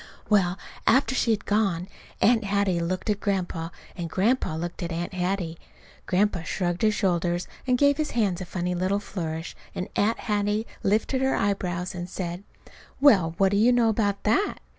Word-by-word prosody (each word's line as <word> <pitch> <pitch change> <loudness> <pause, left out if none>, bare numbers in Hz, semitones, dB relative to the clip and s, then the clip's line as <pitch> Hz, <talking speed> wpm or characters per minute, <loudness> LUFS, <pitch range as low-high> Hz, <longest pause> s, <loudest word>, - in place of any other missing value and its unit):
Well, 190 -3 +3 0.3
after 265 0 +4
she 250 - +1
had 220 -2 +1
gone 195 -4 +1 0.3
Aunt 225 0 +4
Hattie 200 -3 +1
looked 185 +4 -2
at 205 - -2
Grandpa 180 -5 -2 0.3
and 170 -2 -4
Grandpa 200 -1 +1
looked 175 +3 -5
at 170 -1 -3
Aunt 170 +2 -3
Hattie. 180 -2 -2 0.5
Grandpa 190 -1 +2
shrugged 175 +1 -2
his 215 -1 +3
shoulders, 175 -4 0 0.2
and 250 -1 +3
gave 285 +1 +4
his 310 -1 -1
hands 195 -5 +1
a - - -4
funny 180 0 -2
little 185 +3 0
flourish; 165 -5 -5 0.2
and 185 - -4
Aunt 220 +3 +2
Hattie 210 0 0 0.2
lifted 220 +6 +1
her 265 0 +2
eyebrows 185 -2 -1
and 175 0 -6
said: 175 0 -5 0.6
"Well, 190 - +5
what 195 0 +4
do 200 - +2
you 230 +4 +5
know 240 -2 +4
about 205 -2 0
that?" 305 - +2
195 Hz, 175 wpm, -26 LUFS, 175-215 Hz, 0.6 s, Well